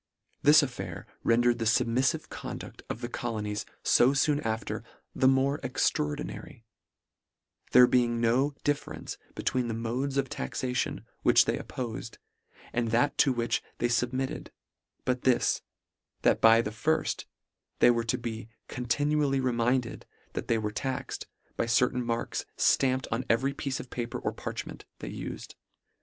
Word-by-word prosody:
This 150 Hz, +1 st, +7 dB
affair 95 Hz, -11 st, -5 dB, 0.2 s
rendered 120 Hz, +1 st, +3 dB
the 115 Hz, -, -1 dB
fubmiffive 120 Hz, +2 st, +2 dB
conduit -, -, -7 dB
of 115 Hz, -, -4 dB
the 120 Hz, -, -2 dB
colonies 105 Hz, -4 st, -3 dB, 0.2 s
fo 130 Hz, +3 st, +5 dB
foon 145 Hz, +2 st, +3 dB
after, 115 Hz, -5 st, -3 dB, 0.3 s
the 130 Hz, -, +3 dB
more 135 Hz, +2 st, +3 dB
extraordinary; 145 Hz, -1 st, -2 dB, 1.1 s
there 125 Hz, 0 st, +9 dB
being 120 Hz, -1 st, +2 dB
no 130 Hz, +5 st, +2 dB
differ 145 Hz, 0 st, -1 dB
ence -, -, -7 dB, 0.2 s
between 125 Hz, -2 st, 0 dB
the 115 Hz, -, -2 dB
modes 125 Hz, +5 st, -2 dB
of 135 Hz, -1 st, +1 dB
taxation 125 Hz, -1 st, -3 dB, 0.2 s
which -, -, +6 dB
they -, -, 0 dB
oppofed, 115 Hz, -2 st, -6 dB, 0.6 s
and 120 Hz, -1 st, 0 dB
that 120 Hz, +6 st, +2 dB
to 140 Hz, -, +5 dB
which 120 Hz, -2 st, 0 dB, 0.2 s
they 120 Hz, -, 0 dB
fub 120 Hz, 0 st, +1 dB
mitted, 130 Hz, 0 st, -3 dB, 0.6 s
but 125 Hz, -1 st, 0 dB
this, 130 Hz, -2 st, +2 dB, 0.6 s
that -, -, +3 dB
by 115 Hz, +1 st, +7 dB
the 105 Hz, -, -3 dB
firft, 155 Hz, +9 st, 0 dB, 0.5 s
they 120 Hz, -, +6 dB
were 115 Hz, -1 st, 0 dB
to 115 Hz, -, 0 dB
be 115 Hz, -1 st, -6 dB, 0.2 s
continually 140 Hz, +3 st, +1 dB
reminded 120 Hz, -1 st, 0 dB, 0.3 s
that -, -, -4 dB
they 115 Hz, -, +2 dB
were 105 Hz, -1 st, -2 dB
taxed, 130 Hz, +3 st, -4 dB, 0.3 s
by 115 Hz, -, 0 dB
certain 125 Hz, +1 st, +2 dB
marks 115 Hz, 0 st, -2 dB
ftampt 130 Hz, -1 st, +3 dB
on 115 Hz, +3 st, 0 dB
every 130 Hz, +5 st, +2 dB
piece 135 Hz, -1 st, -3 dB
of 125 Hz, -, -9 dB
paper 120 Hz, -1 st, -3 dB
or -, -, -2 dB
parchment, -, -, -6 dB
they -, -, -7 dB
ufed. -, -, -7 dB
125 Hz, 150 wpm, -29 LUFS, 115-135 Hz, 1.1 s, there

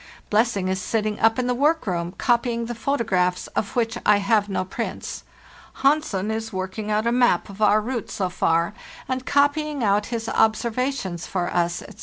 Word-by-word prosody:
Blessing 210 Hz, -3 st, +2 dB
is 190 Hz, 0 st, -1 dB
sitting 215 Hz, +1 st, -1 dB
up 225 Hz, 0 st, +4 dB
in 255 Hz, -, 0 dB
the 250 Hz, -, +1 dB
work 300 Hz, +6 st, +2 dB
room, 175 Hz, -2 st, -2 dB
copying 235 Hz, -1 st, +1 dB
the 240 Hz, -, -4 dB
photographs 215 Hz, -8 st, 0 dB
of 200 Hz, -, -3 dB
which 235 Hz, -1 st, 0 dB
I 210 Hz, -, +5 dB
have 205 Hz, 0 st, +2 dB
no 190 Hz, -1 st, -1 dB
prints. 185 Hz, -, -5 dB, 0.6 s
Hansen 270 Hz, -9 st, +2 dB
is 220 Hz, 0 st, -3 dB
working 190 Hz, +2 st, -4 dB
out 215 Hz, +1 st, +1 dB
a 235 Hz, -, +2 dB
map 240 Hz, -8 st, +2 dB
of 200 Hz, +2 st, -11 dB
our 210 Hz, 0 st, +5 dB
route 235 Hz, +1 st, -4 dB
so 195 Hz, -4 st, -1 dB
far, 170 Hz, 0 st, +1 dB, 0.3 s
and 260 Hz, 0 st, -3 dB
copying 290 Hz, -1 st, +2 dB
out 205 Hz, 0 st, +2 dB
his 230 Hz, -2 st, -4 dB
observations 220 Hz, -5 st, 0 dB
for 180 Hz, -2 st, -2 dB
us, 175 Hz, 0 st, 0 dB
etc. 210 Hz, -, -13 dB
220 Hz, 180 wpm, -23 LUFS, 190-240 Hz, 0.6 s, I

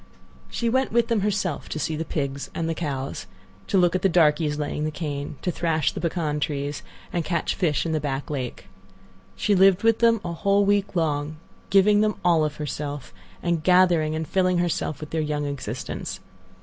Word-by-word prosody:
She 235 Hz, -, -2 dB
went 260 Hz, +3 st, +1 dB
with 235 Hz, 0 st, +2 dB
them 230 Hz, -2 st, +2 dB
herself 195 Hz, -6 st, -1 dB
to -, -, -4 dB
see 155 Hz, +1 st, -1 dB
the 160 Hz, -, -2 dB
pigs 140 Hz, -3 st, -3 dB
and 165 Hz, -, -1 dB
the 165 Hz, -, 0 dB
cows, 140 Hz, -, -4 dB, 0.4 s
to 195 Hz, -, +1 dB
look 175 Hz, -2 st, +4 dB
at 185 Hz, -, 0 dB
the 195 Hz, -, +3 dB
darkies 155 Hz, -3 st, +3 dB
laying 150 Hz, 0 st, -2 dB
the 155 Hz, -, 0 dB
cane, 145 Hz, -2 st, -4 dB
to 180 Hz, -, 0 dB
thrash 160 Hz, -3 st, 0 dB
the -, -, -6 dB
pecan 160 Hz, -3 st, -1 dB
trees, 145 Hz, 0 st, -2 dB, 0.3 s
and 175 Hz, -, 0 dB
catch 170 Hz, 0 st, -1 dB
fish 160 Hz, -4 st, 0 dB
in 165 Hz, -, -1 dB
the 155 Hz, -, +1 dB
back 140 Hz, 0 st, -3 dB
lake. 130 Hz, -8 st, -5 dB, 0.7 s
She 210 Hz, -, +1 dB
lived 190 Hz, 0 st, +5 dB
with 225 Hz, -1 st, +4 dB
them 230 Hz, -1 st, +4 dB
a 170 Hz, -, -3 dB
whole 200 Hz, +3 st, +2 dB
week 200 Hz, -1 st, +1 dB
long, 155 Hz, -2 st, -1 dB, 0.3 s
giving 205 Hz, +1 st, +5 dB
them 215 Hz, -1 st, +1 dB
all 170 Hz, -3 st, +4 dB
of 150 Hz, -1 st, -2 dB
herself, 145 Hz, -3 st, -5 dB, 0.3 s
and 170 Hz, -2 st, 0 dB
gathering 175 Hz, -3 st, +4 dB
and 160 Hz, 0 st, -3 dB
filling 185 Hz, 0 st, +2 dB
herself 175 Hz, -3 st, -1 dB
with 155 Hz, -, -8 dB
their 160 Hz, -, 0 dB
young 150 Hz, -1 st, -2 dB
existence. 140 Hz, -2 st, -5 dB
160 Hz, 195 wpm, -24 LUFS, 150-185 Hz, 0.7 s, lived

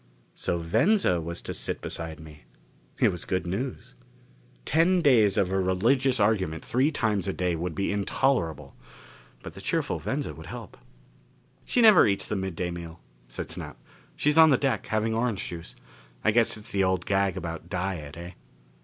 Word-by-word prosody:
So 85 Hz, -, -2 dB
Venza 95 Hz, -, +2 dB
was 85 Hz, +1 st, -4 dB
to -, -, -4 dB
sit -, -, -2 dB
beside 80 Hz, -2 st, -5 dB
me. 75 Hz, -1 st, -13 dB, 0.5 s
It -, -, +3 dB
was 90 Hz, -, -5 dB
good 90 Hz, -1 st, -2 dB
news. 110 Hz, +9 st, -4 dB, 0.7 s
Ten 175 Hz, +4 st, +3 dB
days 115 Hz, -, +4 dB
of 95 Hz, -1 st, +1 dB
a 95 Hz, -, +1 dB
religious 120 Hz, +8 st, +2 dB
argument 95 Hz, -7 st, +1 dB
three 135 Hz, +5 st, +2 dB
times 105 Hz, -, 0 dB
a 95 Hz, -, -1 dB
day 90 Hz, -2 st, -1 dB
would 85 Hz, 0 st, -4 dB
be 100 Hz, -, -1 dB
intolerable. 100 Hz, -, -1 dB, 0.7 s
But -, -, -8 dB
the -, -, -10 dB
cheerful -, -, -1 dB
Venza -, -, -3 dB
would -, -, -11 dB
help. -, -, -9 dB, 0.9 s
"She 245 Hz, -, +1 dB
never 215 Hz, -5 st, +8 dB
eats 100 Hz, -1 st, 0 dB
the -, -, -3 dB
midday 90 Hz, -2 st, -3 dB
meal," 85 Hz, -1 st, -8 dB, 0.3 s
said -, -, -6 dB
Snap. -, -, -7 dB, 0.4 s
"She's 150 Hz, +2 st, +2 dB
on 160 Hz, 0 st, +9 dB
the 135 Hz, -, +5 dB
deck, 135 Hz, 0 st, -1 dB
having 110 Hz, 0 st, 0 dB
orange 115 Hz, -3 st, -1 dB
juice. 85 Hz, -1 st, -8 dB, 0.5 s
I 110 Hz, -, +4 dB
guess 115 Hz, 0 st, +3 dB
it's 110 Hz, +3 st, -7 dB
the 100 Hz, -1 st, +1 dB
old 95 Hz, -1 st, 0 dB
gag 95 Hz, -1 st, +1 dB
about 85 Hz, -1 st, -6 dB
diet, 90 Hz, -5 st, -4 dB
eh?" 85 Hz, +1 st, -8 dB
95 Hz, 170 wpm, -27 LUFS, 85-120 Hz, 0.9 s, on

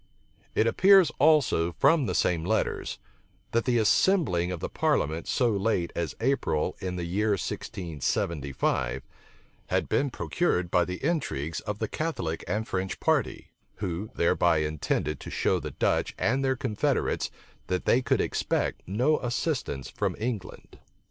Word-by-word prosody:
It -, -, +3 dB
appears 190 Hz, -, +6 dB
also 135 Hz, -, +4 dB
from 150 Hz, -, +3 dB
the -, -, -1 dB
same 85 Hz, -2 st, +1 dB
letters, 110 Hz, +5 st, -1 dB, 0.5 s
that 115 Hz, 0 st, +1 dB
the 125 Hz, -2 st, +2 dB
assembling 110 Hz, -, +3 dB
of 90 Hz, -, -4 dB
the -, -, -3 dB
parliament 80 Hz, +2 st, 0 dB
so 120 Hz, -2 st, +2 dB
late 100 Hz, -4 st, 0 dB
as 85 Hz, -2 st, -2 dB
April 115 Hz, -, 0 dB
in 90 Hz, -1 st, -4 dB
the 90 Hz, -, -3 dB
year 105 Hz, +5 st, +1 dB
1675, 75 Hz, -8 st, -2 dB, 0.6 s
had -, -, 0 dB
been 140 Hz, -, +1 dB
procured 90 Hz, -, -1 dB
by 90 Hz, -, +3 dB
the 90 Hz, +9 st, -5 dB
intrigues 85 Hz, -, -1 dB
of 105 Hz, -1 st, -4 dB
the 110 Hz, -, -2 dB
Catholic 95 Hz, -, -3 dB
and 110 Hz, +1 st, -1 dB
French 95 Hz, 0 st, -3 dB
party, -, -, 0 dB, 0.2 s
who 95 Hz, +1 st, -4 dB
thereby 85 Hz, 0 st, +3 dB
intended 75 Hz, -1 st, -1 dB
to -, -, -8 dB
show -, -, +1 dB
the -, -, -5 dB
Dutch -, -, 0 dB
and 130 Hz, +4 st, +1 dB
their 130 Hz, 0 st, +2 dB
confederates 125 Hz, -6 st, 0 dB, 0.4 s
that 90 Hz, 0 st, -1 dB
they 125 Hz, -, +4 dB
could -, -, +1 dB
expect -, -, -1 dB
no 125 Hz, -, +2 dB
assistance 120 Hz, -, -2 dB
from -, -, -2 dB
England. 110 Hz, -4 st, -5 dB
100 Hz, 145 wpm, -27 LUFS, 85-130 Hz, 0.6 s, appears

